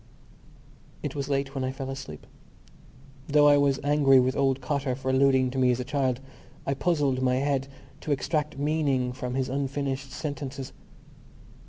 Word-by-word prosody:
It - - -3
was 140 -1 -4
late 135 -1 -1
when 135 -2 -2
I 130 - -1
fell 135 0 -5
asleep. 135 - -8 1.0
Though 145 0 +5
I 145 0 +6
was 140 -1 +2
angry 140 -2 +5
with 130 +1 +1
old 135 -1 +2
Cotter 135 -1 -1
for 130 0 -2
alluding 130 -1 +3
to 135 - -2
me 130 -1 +4
as 125 0 +1
a - - -1
child, 130 -2 0 0.5
I 135 - 0
puzzled 140 -4 +1
my 125 -1 +2
head 135 0 0 0.3
to 150 - -4
extract 150 +1 -1
meaning 140 -4 0
from 125 0 -4
his 130 -1 0
unfinished 135 0 -3
sentences. 140 -2 -5
135 Hz, 165 wpm, -27 LUFS, 130-145 Hz, 1.0 s, I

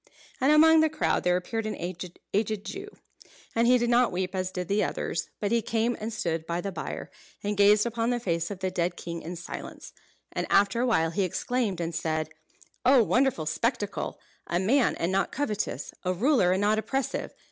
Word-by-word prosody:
And 270 +3 +4
among 320 +1 +7
the 315 0 +4
crowd 310 - 0
there 180 0 +3
appeared 220 +5 -3
an 215 - -3
aged 190 +4 -3
Jew. 395 +1 -6 0.7
And 230 +1 +3
he 250 +1 +6
did 240 0 0
not 245 +1 +4
weep 180 +1 -2
as 185 -1 -1
did 180 -1 -4
the 205 +2 +2
others; - - -2
but 205 0 -1
he 235 0 +3
came 230 +2 0
and 220 +2 -4
stood 165 -7 -2
by 170 +1 -1
the 195 +2 -3
bier, - - -6 0.3
and 205 0 -1
gazed 205 +1 +5
upon 230 0 -1
the 245 -1 +1
face 170 -6 -1
of 195 -2 -7
the 185 0 -1
dead 175 -1 -1
king 170 -1 -6
in 175 +3 -6
silence. 175 +1 -8 0.4
And - - -3
after 205 +4 +3
a 255 - +2
while 165 -9 +2
he 200 - -1
exclaimed, 200 +1 -1
and 170 0 -2
said: 155 -1 -1 0.5
"Oh, 255 -1 +6
wonderful 250 - +2
spectacle! 210 - -2 0.3
A 175 - 0
man, 240 +7 +3
and 170 +2 -1
not 195 +1 +1
covetous. 215 -7 -3
A 185 0 0
ruler, 230 - +3
and 190 +2 +1
not 210 +1 +3
oppressive. 270 +4 -3
205 Hz, 200 wpm, -27 LUFS, 180-235 Hz, 0.7 s, among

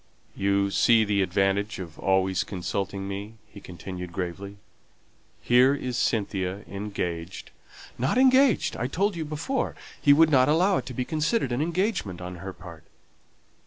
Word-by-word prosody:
"You 100 0 +1
see 115 +2 +4
the 100 -1 +1
advantage 95 +3 0
of 85 -4 -9
always 95 -1 +1
consulting 95 +1 -4
me," 100 +3 -6
he 100 - -14
continued 90 0 -8
gravely. 95 +3 -5 0.9
"Here 125 +3 +5
is 130 -3 -4
Cynthia 100 -3 -1
engaged 95 -3 -5 0.2
" - - -15
"Not 130 - +1
engaged, 260 -2 +4
I 120 - -2
told 195 +7 0
you 165 -2 -3
before. 155 - -2 0.3
He 145 - +5
would 155 +2 +6
not 130 -1 +5
allow 180 +5 +3
it - - -4
to 130 - -7
be 125 - -2
considered 155 - 0
an 120 +3 0
engagement 170 - -1
on 90 0 -7
her 95 +2 -7
part." 85 -4 -12
100 Hz, 155 wpm, -26 LUFS, 95-145 Hz, 0.9 s, would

